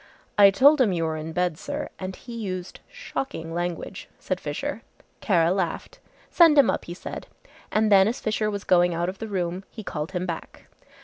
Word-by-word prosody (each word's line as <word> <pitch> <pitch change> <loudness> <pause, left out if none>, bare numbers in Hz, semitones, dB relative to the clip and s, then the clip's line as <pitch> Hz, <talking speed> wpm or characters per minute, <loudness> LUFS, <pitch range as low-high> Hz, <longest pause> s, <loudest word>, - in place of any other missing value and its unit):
"I 200 -1 +8
told 275 +9 +5
him 225 -6 +4
you 170 -2 -1
were 160 -1 -1
in 155 +1 -5
bed, 180 -1 -1
sir, - - -4
and 185 0 -5
he 240 - -11
used 190 -5 -5
shocking 270 - -5
language," 175 0 -4
said - - -3
Fisher. - - -4 0.4
Kara 170 -5 +2
laughed. 185 -3 -3 0.3
"Send 330 -4 +6
him 280 -4 +6
up," - - -4
he 175 - -7
said, - - -7 0.4
and 215 0 +2
then 195 -1 +7
as 230 - -2
Fisher 215 0 -1
was 200 -1 -4
going 175 -1 +3
out 170 +1 -1
of 190 - -8
the 225 - -5
room 185 -2 -2
he 220 - -9
called 155 0 -5
him 180 0 -2
back. 170 -3 -7
185 Hz, 195 wpm, -25 LUFS, 175-215 Hz, 0.4 s, I